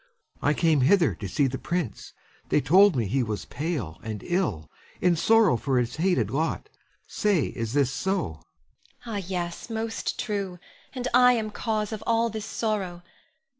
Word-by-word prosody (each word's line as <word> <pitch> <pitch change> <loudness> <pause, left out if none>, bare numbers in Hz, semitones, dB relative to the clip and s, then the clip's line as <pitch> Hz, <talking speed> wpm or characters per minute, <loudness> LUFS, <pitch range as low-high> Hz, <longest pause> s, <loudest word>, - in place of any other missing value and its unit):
I 145 +1 +2
came 160 -4 +3
hither 165 +4 +4
to 100 - -6
see 135 +10 +1
the 130 0 -2
prince. 170 - -3 0.4
They - - +4
told 180 +7 +5
me 120 -3 +1
he 130 +7 0
was 110 -3 -3
pale 135 - -4
and 110 -2 -6
ill, 140 - -1 0.3
in 180 -1 +3
sorrow 215 - +4
for 135 +1 0
his 125 +2 -1
hated 180 +2 +1
lot. 160 - -2 0.4
Say, 195 - +1
is 115 0 -3
this 140 -2 +2
so? 190 +7 0
Ione. 80 - -4 0.7
Ah, 225 -3 -4
yes, 175 +1 -4
most 225 0 -3
true; 200 -5 -3 0.4
and 250 -1 -2
I 250 0 +7
am 220 -3 -2
cause 215 -1 -2
of 220 -1 -5
all 230 0 +2
this 220 -1 -5
sorrow. 195 -6 -2
175 Hz, 170 wpm, -26 LUFS, 130-210 Hz, 0.7 s, I